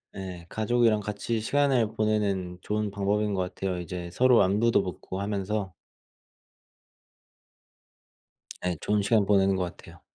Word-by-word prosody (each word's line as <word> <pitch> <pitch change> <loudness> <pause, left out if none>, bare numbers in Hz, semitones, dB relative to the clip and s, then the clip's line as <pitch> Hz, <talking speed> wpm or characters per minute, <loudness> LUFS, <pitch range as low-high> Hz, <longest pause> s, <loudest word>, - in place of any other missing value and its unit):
예 90 -3 -7
가족이랑 110 0 +2
같이 105 +2 -3
시간을 130 -2 +1
보내는 100 -4 0
좋은 105 -1 -2
방법인 100 +1 0
것 95 - 0
같아요. 90 0 -3
이제 90 0 -6
서로 125 +4 +5
안부도 105 +3 +3
묻고 95 +1 -6
하면서 100 -1 -2 2.9
예 90 -1 0
좋은 105 0 +1
시간 105 0 +3
보내는 95 -1 +3
것 95 - 0
같아요. 90 - -9
100 Hz, 270 characters per minute, -27 LUFS, 95-110 Hz, 2.9 s, 서로